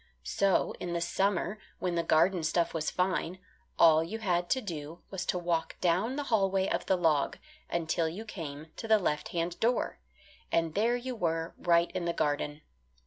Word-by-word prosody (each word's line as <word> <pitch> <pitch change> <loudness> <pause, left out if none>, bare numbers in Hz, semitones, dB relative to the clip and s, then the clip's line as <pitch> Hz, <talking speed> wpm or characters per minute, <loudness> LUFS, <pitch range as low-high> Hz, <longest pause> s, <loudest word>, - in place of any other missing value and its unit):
So 195 -2 +1
in 175 -1 -3
the 170 - 0
summer 195 +3 0 0.2
when 180 -1 -1
the 170 - +1
garden 170 +3 +3
stuff 165 +2 +1
was 155 -2 -1
fine, 180 -1 -1 0.4
all 160 -1 +6
you 180 +7 -4
had 175 -5 0
to 260 - +2
do 165 - -7
was 190 -2 -4
to - - +1
walk 170 -2 -1
down 185 +9 +1
the 290 - -2
hallway 195 -6 +2
of - - -2
the 190 - +4
log, 160 -5 +2 0.3
until 165 -1 0
you 200 +7 -7
came 155 -6 -7
to 225 - -5
the 220 -1 +6
left 150 -6 -1
hand 170 0 -2
door, 240 +2 +1 0.5
and 165 -1 +1
there 230 +6 +2
you 250 +1 -4
were 165 -5 -1
right 170 0 +3
in 185 -2 -3
the 170 - 0
garden. 150 -1 -1
175 Hz, 185 wpm, -30 LUFS, 165-195 Hz, 0.5 s, all